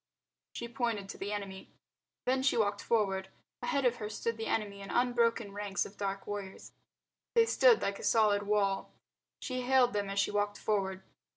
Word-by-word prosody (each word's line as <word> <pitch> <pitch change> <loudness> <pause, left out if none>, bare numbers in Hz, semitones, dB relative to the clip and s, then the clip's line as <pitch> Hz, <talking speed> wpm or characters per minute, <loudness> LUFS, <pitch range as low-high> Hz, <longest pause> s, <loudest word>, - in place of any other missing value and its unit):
She 235 - -5
pointed 230 -5 -2
to - - -8
the 200 +1 -3
enemy. 195 -2 -5 0.6
Then 260 +1 +2
she 265 -2 +2
walked 205 -2 +1
forward. 195 -4 0 0.3
Ahead 280 -3 0
of 245 -1 +3
her 210 -3 -5
stood 230 +2 -2
the 225 0 -4
enemy 205 -2 -2
in 195 - -8
unbroken 235 -3 +2
ranks 205 -1 -2
of 200 - -11
dark 195 -1 -3
warriors. 200 -2 -6 0.6
They 460 -1 +6
stood 470 0 +5
like 200 0 -1
a - - -8
solid 210 -2 +4
wall. 200 -1 +1 0.5
She 255 -2 -3
hailed 250 -1 +4
them 205 -1 -1
as 195 - -4
she 200 - +2
walked 205 0 0
forward. 190 -3 -1
210 Hz, 180 wpm, -32 LUFS, 200-235 Hz, 0.6 s, They